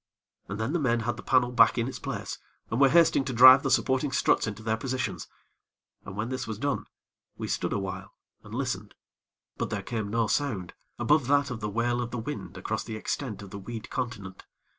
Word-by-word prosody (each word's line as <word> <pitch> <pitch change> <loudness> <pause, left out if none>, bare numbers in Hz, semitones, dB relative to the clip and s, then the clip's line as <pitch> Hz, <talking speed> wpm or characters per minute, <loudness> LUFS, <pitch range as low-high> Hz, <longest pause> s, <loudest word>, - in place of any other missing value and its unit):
And 100 +2 -5
then 110 +7 -1
the 175 - +1
men 120 -5 +1
had 115 +1 -1
the - - -9
panel 125 -1 +2
back 115 -1 +5
in 115 0 0
its 135 - -6
place, - - -5 0.3
and 115 +5 0
were 135 - +7
hasting 165 -2 +5
to 130 - -3
drive 130 +3 +9
the 135 - -1
supporting 130 +2 +2
struts 130 - +2
into 110 0 -6
their 110 0 +1
positions. 130 +2 -3 0.8
And 95 - -8
when 110 +3 -2
this 130 -2 -3
was 110 -2 -4
done, 140 +3 -2 0.5
we - - -4
stood - - -1
awhile 95 -1 -4 0.3
and - - -13
listened; - - -3 0.6
but - - -2
there - - -3
came 110 -3 -3
no 115 +1 +1
sound 105 -7 -1 0.2
above 145 -4 +2
that 140 -1 +3
of 120 - -4
the 105 -1 -3
wail 120 +3 0
of 120 - -3
the 125 - -5
wind 105 -8 -6
across 110 +4 -3
the 110 - -6
extent 110 -1 -4
of 100 - -11
the 100 - -6
weed 110 +3 -7
continent. 115 -7 -5
120 Hz, 210 wpm, -28 LUFS, 110-130 Hz, 0.8 s, drive